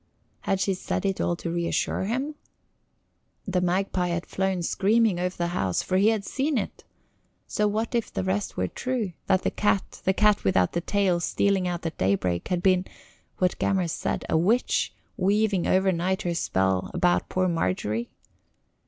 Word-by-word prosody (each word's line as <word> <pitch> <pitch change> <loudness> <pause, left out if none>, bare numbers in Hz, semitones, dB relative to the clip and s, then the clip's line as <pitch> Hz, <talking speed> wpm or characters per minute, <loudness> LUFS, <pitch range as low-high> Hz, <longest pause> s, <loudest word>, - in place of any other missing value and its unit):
Had 195 - -1
she 195 0 +1
said 185 - -3
it 195 -1 0
all 175 - +1
to 170 0 -5
reassure 170 +2 -1
him? 260 +8 -2 1.1
The 185 -2 0
magpie 180 0 0
had 170 0 -2
flown 190 -2 -1
screaming 205 +1 +2
over 180 +1 -2
the 170 0 -1
house 95 - 0
for 185 - 0
he 200 +3 +4
had 220 -3 +1
seen 275 +1 0
it. 210 - -4 0.6
So 210 - 0
what 220 +3 -1
if 235 -2 -1
the 95 - -2
rest 95 +2 -2
were 90 - 0
true 235 - -3
that 190 -1 +3
the - - 0
cat, 205 -2 0
the 190 - +2
cat 210 0 +3
without 95 -2 +3
the 170 - -1
tail 190 -1 +1
stealing 190 +1 +1
out 175 -1 -3
at 165 - -4
daybreak, 90 -2 0
had 180 -1 -1
been 185 -1 +3 0.5
what 180 -1 0
Gammer 190 -3 +1
said 165 - -2
a - - 0
witch, 205 +10 +2 0.3
weaving 200 -1 +2
overnight 190 +1 +1
her 175 - -1
spell 95 - 0
about 175 0 +2
poor 185 0 +1
Margery? 115 - -1
185 Hz, 170 wpm, -26 LUFS, 170-200 Hz, 1.1 s, he